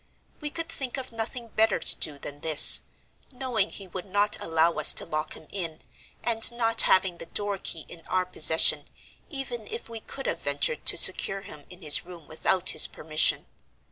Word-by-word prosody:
We 300 - -4
could 330 +2 -5
think 270 -5 -5
of 260 -1 -7
nothing 230 +1 -6
better 220 -1 0
to - - +4
do 150 -2 -3
than 145 +1 -9
this, 155 -1 +6 0.5
knowing 245 -6 -3
he 195 - -11
would 185 +1 -9
not 205 +2 +1
allow 165 +1 0
us - - +2
to - - -1
lock 155 -2 -5
him - - -15
in, 165 -5 -6 0.4
and 230 0 +2
not 230 -1 +2
having 185 -2 +1
the - - -9
door 205 +2 -4
key 160 -4 -6
in 170 - -13
our 185 0 -1
possession, 160 -3 +4 0.4
even 265 - -6
if 455 - -8
we 230 -1 -8
could 270 +4 -10
have - - -3
ventured 480 -1 -2
to - - +5
secure 195 0 +5
him 150 -7 -14
in 180 0 -14
his 150 -1 +6
room 170 -3 -14
without 180 +3 +1
his - - +5
permission. 155 0 0
195 Hz, 190 wpm, -25 LUFS, 165-235 Hz, 0.5 s, this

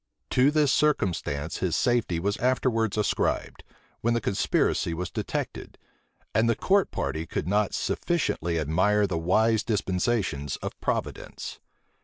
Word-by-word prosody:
To 130 +3 +5
this 150 -2 +3
circumstance 90 - 0
his 90 -3 0
safety 120 -9 +1
was 100 +4 0
afterwards 115 -4 +1
ascribed, 105 - -1 0.4
when 120 +1 +1
the - - +2
conspiracy 95 -4 0
was 90 0 -4
detected; - - -4 0.6
and 110 +2 +3
the 115 - +3
court 195 - +2
party 80 +1 -3
could 75 - -3
not 105 +1 +1
sufficiently 85 - -1
admire 90 +7 +2
the 90 -4 -2
wise 110 +6 +3
dispensations 95 - -1
of - - -5
Providence. - - -4
105 Hz, 130 wpm, -27 LUFS, 85-120 Hz, 0.6 s, To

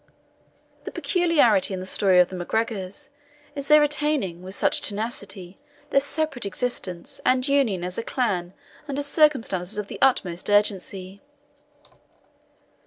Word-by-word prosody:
The - - -6
peculiarity 290 - +2
in - - -5
the 185 - -6
story 190 0 +2
of 180 - +4
the 185 - -7
MacGregors, 195 +2 -3 0.4
is 280 -1 -3
their 300 0 +7
retaining, 295 - 0
with 190 +2 -7
such - - +2
tenacity, 200 -3 -3 0.3
their 275 - +5
separate 295 -2 -2
existence 200 -4 -3
and 255 +1 +2
union 260 -11 +1
as 180 +3 -2
a - - -3
clan 190 -9 -2 0.3
under 285 0 -2
circumstances 260 - +2
of 210 -1 -4
the - - -8
utmost 185 -10 +1
urgency. 200 -2 0
205 Hz, 130 wpm, -24 LUFS, 185-275 Hz, 0.4 s, their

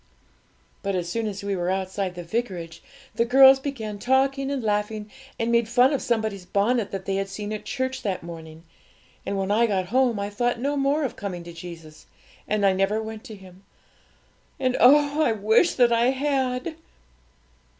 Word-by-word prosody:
But, 200 -1 -2
as 175 -2 -2
soon 225 +5 -2
as 200 -1 -5
we 200 -1 -1
were 175 -1 -2
outside 190 0 -2
the 175 - -6
vicarage, 175 -4 -4 0.3
the 230 - +2
girls 265 +2 +7
began 225 -7 -5
talking 270 +4 +1
and 275 -3 -2
laughing, 210 0 -2 0.3
and 230 +1 -1
made 235 -1 +2
fun 250 +4 +4
of 275 - -1
somebody's 220 -5 -1
bonnet 205 +4 0
that 195 -1 -6
they 195 0 -1
had 195 0 -2
seen 210 +2 -5
at 215 - -6
church 260 0 -3
that 190 -5 -3
morning. 160 -1 -10 0.6
And 200 - -1
when 195 +1 -1
I 230 +3 +3
got 190 -4 -1
home 250 -4 +2
I 200 +1 -3
thought 240 +3 -1
no 280 +3 -1
more 280 +2 +1
of 260 - -3
coming 180 -4 -5
to 170 0 -10
Jesus, 165 -2 -11 0.4
and 210 -1 +1
I 195 - +4
never 195 +3 +1
went 220 0 -7
to 220 -5 -9
Him; 190 -1 -16 1.0
and 255 -1 +1
oh, 290 +3 +5
I 235 - +3
wish 220 - +3
that 240 -2 +4
I 235 +1 +3
had!' 265 +2 -1
215 Hz, 185 wpm, -24 LUFS, 195-255 Hz, 1.0 s, girls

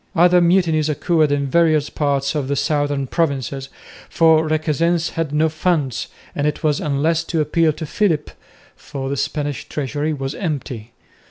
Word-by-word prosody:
Other 175 +1 +5
mutinies 170 -3 +2
occurred 155 0 +1
in 140 -1 +1
various 155 0 +2
parts 140 -2 0
of 145 -4 -2
the 140 - 0
southern 145 -1 0
provinces, 135 -3 -2 0.4
for 160 -1 +4
Requesens 160 +2 +1
had 165 -3 -3
no 155 +2 +2
funds, 155 -5 -1 0.3
and 145 +1 -1
it 150 - -3
was 150 -2 +2
useless 155 +3 0
to 165 - -2
appeal 155 +2 +2
to 160 +1 -6
Philip, 160 -2 0 0.4
for 135 -1 -6
the - - -1
Spanish 145 0 -3
treasury 150 +2 -2
was 135 -2 -3
empty. 135 - -5
150 Hz, 155 wpm, -20 LUFS, 140-165 Hz, 0.4 s, Other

